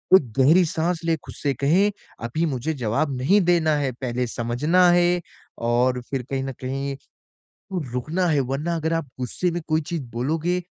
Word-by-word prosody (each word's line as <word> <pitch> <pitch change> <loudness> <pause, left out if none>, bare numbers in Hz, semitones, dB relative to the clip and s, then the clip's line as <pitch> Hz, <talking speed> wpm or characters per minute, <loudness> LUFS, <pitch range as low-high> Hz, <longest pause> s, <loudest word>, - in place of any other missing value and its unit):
एक 135 -11 +3
गहरी 160 +7 +6
साँस 165 +2 -1
लें 165 -1 +2
खुद - - -9
से 140 -2 -1
कहें 165 - +3 0.3
अभी 155 +8 -1
मुझे 145 +1 -2
जवाब 135 +2 -1
नहीं 185 +12 +4
देना 170 -3 +3
है, 140 -3 0
पहले 125 0 -3
समझना 145 +11 +2
है 175 0 +3 0.4
और 125 +2 +1
फिर 135 -2 -2
कहीं 135 -1 -1
न 135 - -3
कहीं, 135 +2 -3 1.0
रुकना 155 +9 -1
है, 155 -4 +2
वरना 140 +6 -1
अगर 160 0 -1
आप 165 -1 -1
गुस्से 130 +8 -1
में 175 +1 -3
कोई 155 0 +2
चीज़ 165 +1 -4
बोलोगे, 160 +9 0
150 Hz, 175 wpm, -23 LUFS, 130-170 Hz, 1.0 s, गहरी